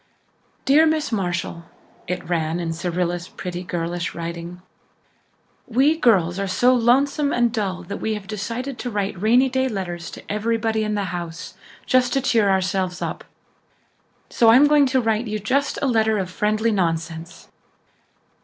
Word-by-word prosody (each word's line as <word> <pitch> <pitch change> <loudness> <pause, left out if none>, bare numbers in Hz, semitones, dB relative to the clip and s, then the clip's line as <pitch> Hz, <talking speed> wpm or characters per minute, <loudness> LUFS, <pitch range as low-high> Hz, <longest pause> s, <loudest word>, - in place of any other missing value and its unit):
"Dear 305 +4 +5
Miss 310 -2 0
Marshall," 175 -4 -2 0.4
it 180 -1 -4
ran 165 -1 -1
in 165 -2 -2
Cyrilla's 175 +1 -2
pretty 180 -1 -6
girlish 175 0 -3
writing, 170 +1 -6 1.0
"we 270 +6 +3
girls 195 - +2
are 200 - -1
so 245 +7 +3
lonesome 275 +4 +2
and 240 -2 +1
dull 195 -4 -2
that 200 - -6
we 220 -1 -1
have 210 -2 -7
decided 230 +6 -5
to 245 - -3
write 200 -4 -3
rainy 240 +5 +4
day 260 0 0
letters 175 -5 -5
to - - -10
everybody 220 +1 0
in 215 0 -1
the 205 - -1
house 170 -1 -6 0.3
just 255 -1 +2
to 270 - +2
cheer 225 -6 +2
ourselves 185 -1 0
up. - - -4 1.0
So 230 - +3
I'm 255 +6 +7
going 290 -1 +5
to 260 0 +2
write 225 0 0
to - - -6
you 215 - -2
just 260 +7 0
a - - +2
letter 220 -3 +2
of 185 -2 -3
friendly 215 +4 0
nonsense." 165 -3 -3
210 Hz, 160 wpm, -22 LUFS, 175-245 Hz, 1.0 s, I'm